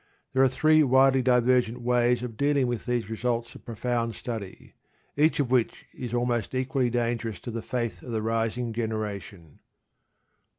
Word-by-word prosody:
There 130 - +3
are 135 - +5
three 155 +4 +4
widely 135 -1 +4
divergent 125 -1 +2
ways 120 0 +2
of 120 -3 -5
dealing 140 +1 +2
with 120 -2 -3
these 120 -3 -1
results 115 +1 -2
of - - -14
profound 115 0 -2
study, 110 -6 -7 0.4
each 150 +1 +3
of 130 -4 0
which 125 -3 +1
is 125 -3 -6
almost 120 -1 -1
equally 130 -1 0
dangerous 115 -3 -2
to 120 - -6
the 115 0 -4
faith 115 -7 -3
of - - -11
the 110 -1 -2
rising 115 +1 -1
generation. 105 -7 -5
120 Hz, 160 wpm, -27 LUFS, 115-125 Hz, 0.4 s, are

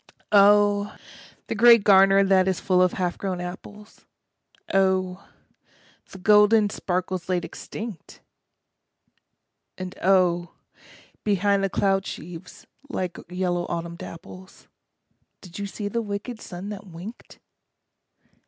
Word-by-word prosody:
Oh, 205 0 +4 0.5
the - - -4
grey 235 +2 +7
garner 195 -1 +5
that 190 -1 +3
is 190 -2 0
full 185 -1 +2
of 180 -1 +3
half 180 -2 -2
grown 190 -2 -3
apples, 205 +4 -10 0.7
Oh, 190 -1 0 0.8
the - - -11
golden 210 +2 +4
sparkles 185 -2 -3
laid 180 -1 0
extinct! 215 -7 -9 1.6
And 185 0 -6
oh, 175 -2 +2 0.7
behind 200 -1 +1
the 195 - +1
cloud 195 0 0
sheaves, 175 +1 -9 0.2
like 185 -10 -4
yellow 180 -1 -2
autumn 170 0 -4
dapples, 180 +3 -12 0.7
Did 180 0 -11
you 200 - -3
see 205 +1 -5
the 235 +3 -2
wicked 215 +2 -6
sun 180 +3 -8
that 205 -1 -8
winked? 185 +7 -11
195 Hz, 115 wpm, -24 LUFS, 180-205 Hz, 1.6 s, grey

